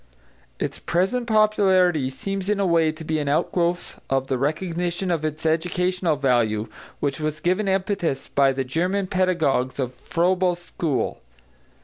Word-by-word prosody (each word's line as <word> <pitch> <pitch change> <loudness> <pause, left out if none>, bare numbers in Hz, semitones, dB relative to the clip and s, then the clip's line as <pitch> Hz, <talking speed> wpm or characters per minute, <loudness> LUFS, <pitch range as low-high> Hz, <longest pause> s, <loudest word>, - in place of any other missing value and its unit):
Its - - -3
present 195 +8 0
popularity 190 - +3
seems 195 +8 -4
in 210 -1 +1
a 200 - +2
way 165 -3 +3
to 155 +1 -10
be 155 0 -1
an 145 -1 -1
outgrowth 175 +4 0
of 135 0 0
the 130 - +1
recognition 175 +5 -1
of 165 -3 0
its 155 +1 -3
educational 175 +1 +1
value 120 -6 +1 0.3
which 140 -1 -1
was 155 0 -2
given 185 +5 0
impetus 190 -7 -1
by 135 -1 +3
the 135 0 -2
German 180 +9 0
pedagogues 170 -9 +1
of 130 -2 -2
Froebel's 180 +6 +1
school. 165 -5 -2
170 Hz, 145 wpm, -23 LUFS, 140-185 Hz, 0.3 s, popularity